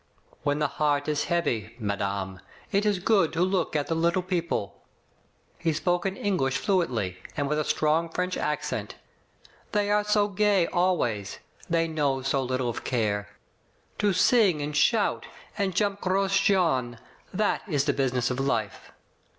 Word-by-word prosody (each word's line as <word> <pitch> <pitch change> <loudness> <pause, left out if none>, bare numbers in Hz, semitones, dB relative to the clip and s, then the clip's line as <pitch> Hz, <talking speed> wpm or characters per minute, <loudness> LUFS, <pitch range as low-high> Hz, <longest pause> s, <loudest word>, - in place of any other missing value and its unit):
"When 145 0 0
the 150 - +1
heart 145 0 0
is 150 -1 0
heavy, 150 - -1
madame, 100 -3 -3 0.3
it 200 +2 +2
is 205 -2 +2
good 190 -2 +2
to 170 +2 +2
look 185 -3 0
at 145 -1 +1
the - - -2
little 170 +3 +1
people. 170 - -2 0.8
He 165 -2 0
spoke 175 +4 0
in 190 0 -4
Eng 200 -2 0
lish 135 -3 0
fluently, 125 - 0 0.2
and 145 -1 0
with 150 +1 0
a - - +1
strong 155 +3 +1
French 180 +2 -2
accent. 150 0 -3 0.8
"They 205 -1 +1
are 210 0 +3
so 210 0 +2
gay 200 -2 +2
always. 155 - 0 0.3
They 165 0 +2
know 145 -4 0
so 135 0 +1
little 130 -1 -1
of 120 - -4
care. 105 -4 -1 0.7
To 205 -1 +3
sing 190 -2 +4
and 145 0 -3
shout, 210 +8 +2 0.3
and 195 -4 -1
jump 200 0 0
Gros 195 +1 +1
Jean, 160 - +2 0.3
that 210 +3 0
is 145 -6 +1
the 145 - +2
business 130 -2 0
of 125 - -3
life. 115 -7 -2
160 Hz, 160 wpm, -27 LUFS, 135-190 Hz, 0.8 s, sing